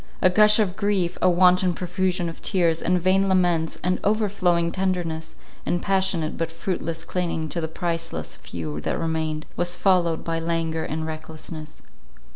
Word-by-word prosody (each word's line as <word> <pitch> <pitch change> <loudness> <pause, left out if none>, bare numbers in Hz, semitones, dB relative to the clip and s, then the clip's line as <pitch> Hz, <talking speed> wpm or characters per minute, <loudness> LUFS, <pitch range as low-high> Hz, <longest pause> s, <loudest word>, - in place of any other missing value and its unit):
A 185 - +4
gush 210 +2 +6
of 200 -5 +1
grief, 195 -4 0
a 185 - +5
wanton 180 0 +4
profusion 180 0 -1
of 165 - -7
tears, 170 -4 +1
and 180 +1 +2
vain 190 +2 +3
laments, 175 -3 +2
and 180 +1 +1
overflowing 190 -5 +1
tenderness, 175 -4 -2 0.3
and 175 - 0
passionate 190 -4 0
but 165 0 -1
fruitless 165 -1 -3
clinging 170 -3 -2
to 170 - -2
the 160 - -1
priceless 165 0 -3
few 75 -3 -6
that - - -2
remained, 160 -1 -2
was 175 0 0
followed 175 -4 +2
by 165 -1 -2
languor 165 -1 -1
and 160 +1 -3
recklessness. 155 0 -8
175 Hz, 155 wpm, -24 LUFS, 160-185 Hz, 0.3 s, gush